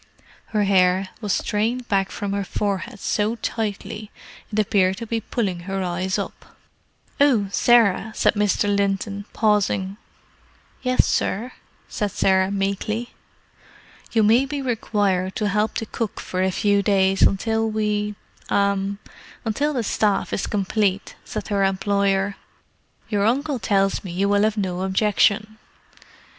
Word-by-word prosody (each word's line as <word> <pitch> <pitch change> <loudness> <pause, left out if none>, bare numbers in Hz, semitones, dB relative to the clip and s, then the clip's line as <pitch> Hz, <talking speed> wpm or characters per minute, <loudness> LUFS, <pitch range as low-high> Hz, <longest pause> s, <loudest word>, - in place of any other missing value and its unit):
Her 210 -2 0
hair 190 -1 +3
was 210 -2 -2
strained 230 +6 -1
back 195 -3 +1
from 200 -1 -4
her 200 0 -1
forehead 200 0 -3
so 210 +4 0
tightly 215 -2 -4 0.4
it 210 - -4
appeared 190 -3 +2
to 230 - -5
be 225 0 -2
pulling 200 -6 -2
her 195 0 -1
eyes 185 +1 -1
up. - - -7 0.6
"Oh, 245 -9 +4
Sarah," 220 -2 +4
said - - +3
Mr. 205 -1 +1
Linton, 200 0 -1
pausing. 205 -2 +1 0.8
"Yes, 255 0 +3
sir," 235 +6 -1 0.4
said 210 - -2
Sarah 190 0 +2
meekly. 200 +4 -2 1.0
"You 225 -2 +3
may 235 +6 +4
be 290 +1 -3
required 205 -7 0
to 210 - 0
help 210 +2 0
the 225 - -3
cook 220 -1 -4
for 185 - -3
a 190 - +2
few 200 +2 +2
days 195 -1 +2
until 220 +3 +2
we—er—until 205 -2 -1 0.8
the 245 -4 -1
staff 205 -1 0
is - - -1
complete," 200 -1 -1
said 215 -1 -6
her 200 -2 +1
employer. 195 0 +1 0.7
"Your 205 -1 +1
uncle 275 +3 0
tells 195 -1 +1
me 190 - -7
you 190 +3 0
will 200 0 +3
have 215 +1 +1
no 185 -3 -2
objection." 210 +2 +1
205 Hz, 135 wpm, -22 LUFS, 195-220 Hz, 1.0 s, Oh